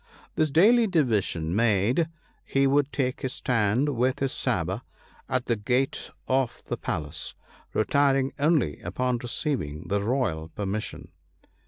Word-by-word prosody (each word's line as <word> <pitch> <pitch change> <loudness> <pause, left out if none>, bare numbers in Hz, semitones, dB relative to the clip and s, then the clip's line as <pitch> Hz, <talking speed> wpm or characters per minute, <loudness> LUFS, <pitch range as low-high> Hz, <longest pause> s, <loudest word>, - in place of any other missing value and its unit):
This 155 -1 +1
daily 220 - +5
division 105 - +1
made, 115 - +2 0.3
he 135 0 +1
would 140 +1 +2
take 130 -2 -1
his 130 -2 -1
stand 115 +3 +1
with 130 -1 +1
his 135 -1 -1
sabre - - -1 0.5
at 130 -1 0
the 115 - +1
gate 125 +5 -1 0.2
of 130 -2 0
the - - -2
palace; 75 +1 -3 0.4
retiring 135 +3 +2
only 145 - +2
upon 125 +7 -1
receiving 120 - -3
the 100 0 +1
royal 100 -9 -1
permission. 100 +3 -4
125 Hz, 130 wpm, -26 LUFS, 105-140 Hz, 0.5 s, daily